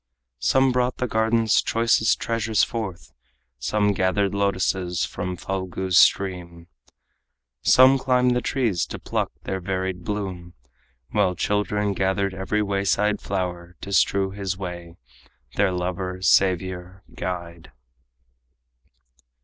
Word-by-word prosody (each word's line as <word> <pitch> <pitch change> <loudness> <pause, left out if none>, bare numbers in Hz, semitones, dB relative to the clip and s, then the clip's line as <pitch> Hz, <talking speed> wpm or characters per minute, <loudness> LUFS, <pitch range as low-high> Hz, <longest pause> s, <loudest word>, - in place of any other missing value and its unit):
Some 130 - +3
brought 125 0 0
the 125 - -1
garden's 110 0 +2
choicest 115 -1 +2
treasures 115 -2 0
forth, 100 -7 -4 0.5
Some 105 - +1
gathered 95 +1 +1
lotuses 95 -3 0
from 90 0 -5
Phalgu's 95 -1 -3
stream, 90 -3 +2 1.0
Some 130 - +6
climbed 125 -1 +2
the 125 - +1
trees 120 -12 0
to - - -6
pluck - - -2
their 95 - -3
varied 95 -1 -3
bloom, 95 -4 -5 0.6
While 95 -3 +1
children 105 0 0
gathered 95 0 0
every 95 +3 -1
wayside 100 +1 0
flower 90 -2 -4
To 100 - -6
strew 95 0 +2
his 100 -1 -4
way 85 -2 -7 0.6
their 100 -1 +2
lover, 90 +1 -3
savior, 95 0 +1
guide. 85 -1 -6
95 Hz, 110 wpm, -23 LUFS, 90-105 Hz, 1.0 s, Some